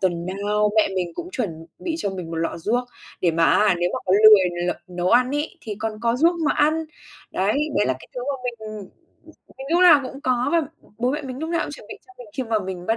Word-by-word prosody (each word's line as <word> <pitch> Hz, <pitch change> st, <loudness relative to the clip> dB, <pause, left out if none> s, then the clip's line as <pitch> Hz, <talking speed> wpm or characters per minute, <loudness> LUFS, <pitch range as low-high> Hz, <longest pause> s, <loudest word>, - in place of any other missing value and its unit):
tuần 175 Hz, -2 st, -1 dB
nào 205 Hz, +2 st, 0 dB
mẹ 215 Hz, -, +4 dB
mình 175 Hz, -2 st, -2 dB
cũng 350 Hz, -, -6 dB
chuẩn 165 Hz, -, -4 dB
bị 335 Hz, -3 st, -3 dB
cho 200 Hz, -, -2 dB
mình 180 Hz, -3 st, -6 dB
1 165 Hz, -, -4 dB
lọ 165 Hz, +1 st, -2 dB
ruốc, 235 Hz, +8 st, 0 dB, 0.4 s
để 175 Hz, -, +3 dB
mà 165 Hz, 0 st, +2 dB
á 205 Hz, 0 st, +4 dB
nếu 175 Hz, -, +1 dB
mà -, -, -1 dB
có 185 Hz, -, +2 dB
lười 180 Hz, -5 st, +6 dB
l -, -, +2 dB, 0.2 s
nấu 180 Hz, 0 st, -2 dB
ăn 250 Hz, +2 st, +4 dB
ấy 310 Hz, +5 st, -3 dB
thì 215 Hz, -3 st, -6 dB
còn 220 Hz, 0 st, -2 dB
có 235 Hz, +1 st, +1 dB
ruốc 335 Hz, +5 st, +4 dB
mà -, -, +3 dB
ăn. 305 Hz, +1 st, +3 dB, 0.6 s
Đấy, 195 Hz, +3 st, 0 dB, 0.3 s
đấy -, -, +2 dB
là 130 Hz, -, +2 dB
cái -, -, -15 dB
thứ 250 Hz, -, -4 dB
mà 285 Hz, 0 st, -1 dB
mình, 245 Hz, -, -2 dB, 0.2 s
ừm, 200 Hz, -, -9 dB, 0.7 s
mình 270 Hz, -, -7 dB
lúc 345 Hz, +2 st, +3 dB
nào 340 Hz, -5 st, +8 dB
cũng 270 Hz, +2 st, -8 dB
có, 250 Hz, -1 st, +1 dB
và 335 Hz, -1 st, +3 dB, 0.4 s
bố 245 Hz, +2 st, +1 dB
mẹ 300 Hz, +2 st, -3 dB
mình 260 Hz, -1 st, -6 dB
lúc 320 Hz, +2 st, -4 dB
nào 335 Hz, -1 st, +1 dB
cũng -, -, -7 dB
chuẩn 290 Hz, -, -11 dB
bị -, -, -7 dB
cho 380 Hz, -, -17 dB
mình 245 Hz, -, -10 dB
khi 260 Hz, -, -1 dB
mà 225 Hz, -2 st, 0 dB
mình 185 Hz, -2 st, -6 dB
bắt 225 Hz, -, +1 dB
215 Hz, 265 wpm, -23 LUFS, 185-270 Hz, 0.7 s, nào